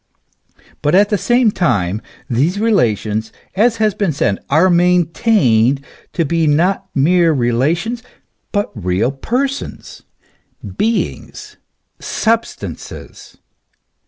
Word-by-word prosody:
But 150 +4 +2
at 205 +2 +4
the 210 - +1
same 240 -2 +3
time 105 - 0 0.3
these 150 - 0
relations, 110 - 0 0.2
as 230 +4 +2
has 215 -1 +1
been 195 -3 -1
said, 100 -8 -1
are 155 +6 +4
maintained 170 - +2 0.3
to 165 - 0
be 165 +1 +1
not 170 +6 +1
mere 165 +4 +3
relations, 150 - 0 0.5
but 205 -1 -1
real 100 +2 -1
persons, 260 - -4 0.7
beings, 225 - -3 0.4
substances. 230 +1 -4
170 Hz, 100 wpm, -17 LUFS, 130-210 Hz, 0.7 s, at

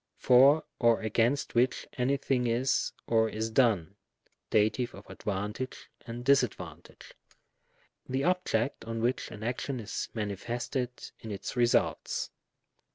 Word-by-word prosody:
for 135 +5 +6 0.2
or 115 -2 +4
against 115 +5 +1
which, 125 +2 +2
any 130 +2 +1
thing 130 -3 0
is, 120 +3 +1
or 110 -1 +3
is 110 +1 -3
done, 105 -7 +2 0.5
(Dat. 110 +3 +3
of 110 -5 -4
advantage 105 +5 -4 0.2
and 120 +1 -6
disad 135 -4 +4
vantage,) 85 -2 -11 1.0
the 130 +1 0
object 175 -9 0
on 115 0 -4
which 125 +2 0
an 110 -1 -9
action 125 +2 -2
is 110 -1 -4
manifested 120 +4 -2 0.3
in 110 - -9
its 100 +2 -5
results. 120 -1 +1
120 Hz, 125 wpm, -30 LUFS, 110-130 Hz, 1.0 s, for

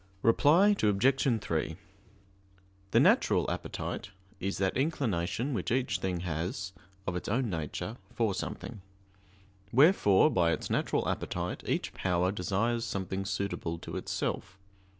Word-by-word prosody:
Reply 165 - +5
Obj. 120 +4 +3
3: 80 0 -2 1.1
The - - +4
"natural - - +4
appetite" 100 - -4 0.3
is 100 +2 -2
that 95 -1 0
inclination 130 - 0
which 100 -7 -2
each 125 -7 +1
thing 90 -2 -2
has, 90 +3 -3 0.3
of 90 - -2
its 90 - -4
own 120 0 0
nature, 80 - -4
for 110 -4 0
something; 95 +2 -5 0.9
wherefore 140 - +5
by 85 -5 +3
its - - -4
natural - - 0
appetite - - -3
each - - -1
power 90 0 +1
desires 105 +5 0
something 95 -3 -3
suitable 100 -4 -2
to - - -8
itself. 95 - -3
100 Hz, 125 wpm, -30 LUFS, 90-120 Hz, 1.1 s, Reply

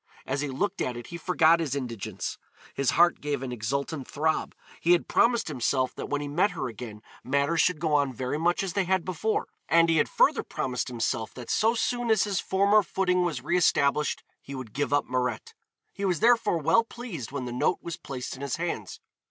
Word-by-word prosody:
As 135 +1 -2
he 150 - -1
looked 180 +9 -2
at 125 -1 -2
it 120 - -8
he 170 - -7
forgot 170 -1 +4
his 145 -5 -2
indigence, 120 -7 -5 0.3
his 140 -3 0
heart 175 +1 +4
gave 145 -2 -2
an 130 - -4
exultant 135 +5 -3
throb. 155 +2 -1 0.2
He 175 - +4
had 175 - +1
promised 235 0 +3
himself 130 -2 0
that - - -6
when 145 0 -1
he 145 - -4
met 175 +8 +2
her - - -2
again 110 -2 -8 0.2
matters 140 +5 +2
should 180 -4 +2
go 155 -1 0
on 145 -2 +3
very 130 +4 -3
much 175 +3 +1
as 190 -3 -3
they 195 -2 +1
had 190 -1 +1
before, 185 +5 -1 0.2
and 165 0 +5
he 165 - +3
had - - +2
further - - +3
promised 125 -1 -3
himself 115 -2 -2
that 125 -2 -6
so 225 +2 +3
soon 240 +1 -1
as 220 -3 +4
his 200 -4 -1
former 200 +2 +3
footing 180 -1 +1
was 160 -8 -2
re 175 - 0
established 150 -4 +2 0.2
he 140 - -8
would 125 -5 -8
give 145 +1 -1
up 145 0 +2
Mirette. 125 -2 -2 0.4
He 200 - -6
was 180 -5 +1
therefore 235 -6 +4
well 195 +9 +3
pleased 225 - -7
when 140 -3 -4
the 120 - -5
note 125 +8 +1
was 170 -2 -5
placed 130 -2 -6
in 130 - -11
his 140 -2 -2
hands. 165 - -4
150 Hz, 215 wpm, -27 LUFS, 130-180 Hz, 0.4 s, and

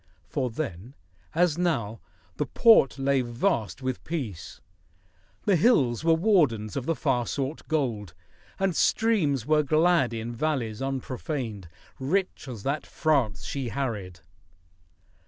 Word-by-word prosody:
For 130 -3 -2
then, 115 - -6 0.4
as 170 -1 +2
now, 115 -12 -1 0.4
the - - -1
Port 225 - +5
lay 135 0 +2
vast 120 - -1
with 130 -1 -3
peace, 120 - -5 0.9
The 200 - +4
hills 150 - +3
were 165 0 +4
wardens 150 - +2
of 135 -1 -3
the 165 - +1
far 125 -6 0
sought 140 +2 -4
gold, 115 - -2 0.4
And 195 -3 0
streams 160 - +2
were 155 +1 +3
glad 155 -2 +3
in 115 +1 -4
valleys 120 -5 -2
unprofaned, 130 - -4 0.3
Rich 180 +5 -1
as 115 -6 -7
that 140 +3 -2
France 125 - 0
she 135 -4 -3
harried. 105 -9 -4
135 Hz, 125 wpm, -27 LUFS, 115-160 Hz, 0.9 s, Port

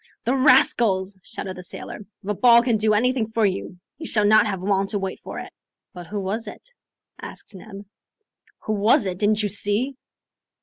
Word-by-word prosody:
"The 245 - +1
rascals!" 245 -8 +3
shouted 185 +1 -7
the - - -7
sailor. 180 - -7 0.3
"If - - -12
a - - +1
ball 235 +2 +5
can 240 -3 +1
do 215 0 +2
anything 250 +1 +1
for 220 -1 +1
you, 190 -2 -3 0.2
you 325 - -6
shall 210 -2 +1
not 215 +1 +5
have 190 -3 -4
long 195 0 +1
to 205 - -2
wait 190 -1 -4
for - - -9
it. - - -8 0.4
"But 175 -2 -10
who 205 +4 -4
was 205 +4 -3
it?" - - -10 0.5
asked - - -8
Neb. 200 +1 -11 0.8
"Who 215 - -2
was 210 +1 +3
it? 185 -1 -4
Didn't 210 +1 +2
you 205 - 0
see?" 205 +7 0
210 Hz, 190 wpm, -23 LUFS, 195-230 Hz, 0.8 s, ball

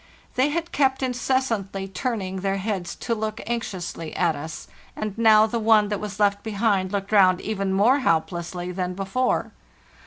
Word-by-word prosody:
They 260 +3 +2
had 335 +2 -3
kept 265 -1 +1
incessantly 240 -6 -1
turning 195 -2 -3
their 195 +1 -1
heads 195 -3 -3
to 235 - -2
look 220 0 -3
anxiously 185 -8 -4
at 170 -3 +2
us, 160 +2 -7 0.3
and 215 -2 -4
now 220 -1 +6
the 230 +1 -2
one 215 -2 +4
that 205 -2 -2
was 210 -2 -6
left 200 -1 +2
behind 205 -3 0
looked 200 0 -3
round 185 -3 +5
even 195 -2 -2
more 220 +9 +4
helplessly 175 - -1
than 180 0 -3
before. 195 +7 -1
205 Hz, 160 wpm, -24 LUFS, 185-225 Hz, 0.3 s, now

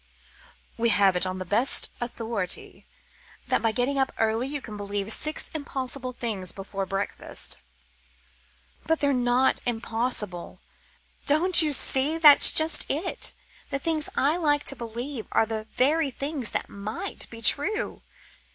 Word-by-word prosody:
"We 235 0 +2
have 200 -3 +3
it 180 +1 -1
on 185 0 -4
the 185 - -6
best 220 +9 +3
authority 230 -6 -4 0.6
that - - +1
by 225 - +1
getting 255 +4 -1
up 265 - 0
early 225 +3 0
you 290 +1 -4
can 225 -5 -10
believe 205 +1 -3
six 305 +1 0
impossible 265 -3 -5
things 215 -7 -3
before 195 0 -6
breakfast." 195 +1 -2 1.3
"But 325 0 +1
they're 285 -1 +1
not 250 +1 +2
impossible. 225 -5 -4 0.7
Don't 340 +6 +6
you 310 -2 +1
see 280 +2 0
that's 300 -3 +9
just 315 0 +3
it? 320 +7 -1 0.3
The 275 - -1
things 310 +1 -1
I 295 +5 +1
like 295 -4 +1
to 275 - +1
believe 240 +1 -6
are - - +3
the 220 0 -5
very 295 +3 +2
things 275 -2 -3
that - - -3
might 205 +2 -5
be 230 - -11
true. 290 - +1
245 Hz, 140 wpm, -25 LUFS, 215-285 Hz, 1.3 s, that's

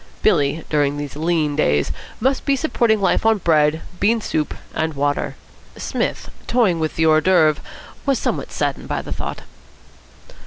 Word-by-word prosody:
Billy, 145 +3 +2
during 145 -1 +1
these 145 -1 -5
lean 155 -2 0
days, 75 - +2 0.3
must 265 +3 +1
be 280 - +2
supporting 235 -6 +1
life 195 - +2
on 225 -1 +4
bread, 160 -3 +2 0.2
bean 225 +3 +3
soup, 155 -7 -2 0.2
and 160 -1 -1
water. 145 +1 -1 0.4
Psmith, - - -3 0.2
toying 215 -9 +2
with 155 -1 -2
the 160 - +2
hors 155 0 +5
d'oeuvre, 160 -5 +3 0.4
was 275 -2 +2
somewhat - - -2
saddened - - -2
by - - -2
the - - -5
thought. - - -5
160 Hz, 155 wpm, -20 LUFS, 150-215 Hz, 0.4 s, hors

